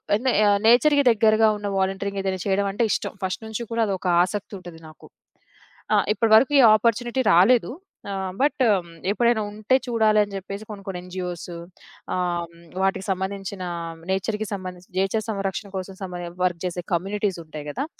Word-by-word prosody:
అన్ 220 - -3
నె - - +5
య 210 - +5 0.2
నేచర్‌కి 285 +5 +5
దెగ్గరగా 220 0 +4
ఉన్న 205 - -5
వాలంటీరింగ్ 195 +1 -1
ఏదైనా 190 -1 -2
చేయడం 200 0 +1
అంటే 230 +4 0
ఇష్టం. - - -1
ఫస్ట్ 185 +4 -3
నుంచి 220 +2 -4
కూడా 230 - 0
అదొక 190 -1 -3 0.2
ఆసక్తి 205 +3 -4
ఉంటది 175 -2 -11
నాకు. 155 - -15 0.9
ఆహ్, - - +3
ఇప్పటి 220 +1 0
వరకు 265 +6 +5
ఈ - - +9
ఆపర్చునిటీ 235 +3 0
రాలేదు. 230 +9 +5 0.4
ఆహ్, 190 -1 -3
బట్ 285 -1 +1 0.5
ఎప్పుడైనా 235 0 +2
ఉంటే, 215 +5 +1
చూడాలని 215 -3 +2
జెప్పేసి 200 +2 -6
కొన్ని, 200 -2 -8
కొన్ని 180 -2 -4
ఎన్‌జీఓస్, 180 -1 -6 0.7
ఆహ్, 175 -1 -1
హ్మ్. 170 0 -18 0.2
వాటికి 195 0 0
సంబంధించిన 190 0 -4 0.5
నేచర్‌కి 210 +2 -1
సంబంధించిన 185 -2 -8
నేచర్ 200 +3 0
సంరక్షణ 195 -1 -3
కోసం 190 0 -6
సమరేం 175 -2 -6
వర్క్ 180 -2 0
చేసే 180 -1 -3
కమ్యూనిటీసుంటాయి 170 -5 -3
కదా. 275 - -3
195 Hz, 155 wpm, -24 LUFS, 185-220 Hz, 0.9 s, ఈ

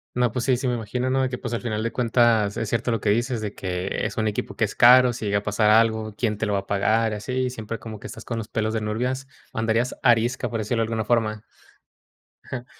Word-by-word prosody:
No, 125 -2 +2
pues 125 -1 -2
sí, 130 -2 +3
sí 130 - -2
me 125 - +1
imagino, 125 +3 -2
¿no? 135 0 +2
De 130 - +1
que, 125 - -4
pues, 120 -1 -5
al 115 - -2
final 110 -3 -2
de 115 - -1
cuentas, 115 -4 +2
es 110 - -2
cierto 115 +2 -1
lo 115 -2 +1
que 105 - -1
dices, 120 +2 0
de 105 -2 -4
que 90 0 -3
es - - -4
un 110 -1 +1
equipo 105 - -3
que - - 0
es - - -6
caro, 125 +1 +7
si 110 - -6
llega 100 0 +1
a 100 - -12
pasar 105 +1 +2
algo, 110 -1 +3
quién 110 -3 -1
te 110 - -1
lo 105 - 0
va 100 - +2
a 100 - -9
pagar 110 +3 +2
y 105 - -2
así. 125 +4 -2
Siempre 115 -2 -5
como 110 -2 -9
que - - -8
estás - - -10
con 115 - -4
los 105 - -6
pelos 110 -1 -2
de 110 - -1
nurvias, 125 +5 -2 0.3
andarías 115 +2 0
arisca, 120 +2 +2
por 115 - -3
decirlo 115 +2 -1
de - - +2
alguna 110 -1 -2
forma. 110 -2 0 1.0
Ajá. 125 -1 -6
115 Hz, 265 wpm, -24 LUFS, 105-120 Hz, 1.0 s, caro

